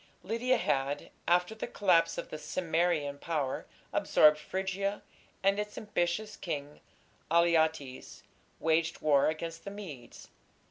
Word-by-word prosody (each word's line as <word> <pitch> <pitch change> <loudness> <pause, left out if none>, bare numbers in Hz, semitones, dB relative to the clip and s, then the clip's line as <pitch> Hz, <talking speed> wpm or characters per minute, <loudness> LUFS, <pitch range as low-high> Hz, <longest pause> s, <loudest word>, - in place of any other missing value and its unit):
Lydia 235 +5 +1
had, 140 -3 -1 0.2
after 180 +4 +3
the 220 - -5
collapse 180 -5 +3
of - - -5
the 155 - -5
Cimmerian 160 -2 0
power, 150 -5 -2 0.3
absorbed 150 0 +5
Phrygia, 190 +4 -2 0.4
and 195 +1 +3
its 210 0 -4
ambitious 210 +1 -1
king, 150 -4 -5 0.5
Alyattes, 160 -5 +1 0.4
waged 160 0 +1
war 145 -3 +4
against 165 +1 -5
the - - -5
Medes. 160 - -10
165 Hz, 120 wpm, -31 LUFS, 150-195 Hz, 0.5 s, absorbed